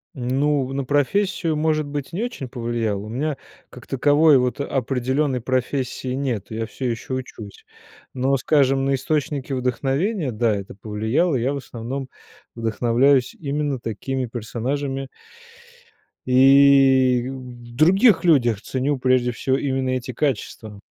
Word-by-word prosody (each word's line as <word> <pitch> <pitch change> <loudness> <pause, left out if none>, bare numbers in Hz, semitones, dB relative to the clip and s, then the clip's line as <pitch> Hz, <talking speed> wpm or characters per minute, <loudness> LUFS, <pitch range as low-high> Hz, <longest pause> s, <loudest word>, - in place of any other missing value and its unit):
Ну 135 +2 0
на 140 0 -2
профессию, 160 +5 0
может 155 0 0
быть, 145 -1 -5
не 195 +7 -2
очень 240 - -5
повлияло, 115 -4 -2
у 105 - -8
меня 140 +4 -2 0.3
как 125 - -13
таковой 145 +2 +4
вот 125 +2 -1
определенной 130 +1 -1
профессии 130 +1 -2
нет, 130 -7 -2
я 110 0 -3
все 125 +2 -4
еще 115 +2 -5
учусь, 115 -5 -7 0.5
но, 130 +2 +1
скажем, 135 -1 +2
на 135 0 +2
источники 140 0 -2
вдохновения, 135 - -1
да, 110 -1 +1
это 100 -1 -7
повлияло, 110 - 0
я 130 +3 0
в - - -3
основном 130 +1 -6 0.5
вдохновляюсь 120 +3 +2
именно 145 -2 -2
такими 125 +3 -3
персонажами. 130 +4 -4 1.2
И 130 -1 +5
в 125 -3 -10
других 190 - +4
людях 120 - +3
ценю 135 +4 -1
прежде 125 -1 +2
всего 130 +3 -1
именно 135 -2 -1
эти 130 0 -2
качества. 110 -5 -3
130 Hz, 130 wpm, -22 LUFS, 120-140 Hz, 1.2 s, И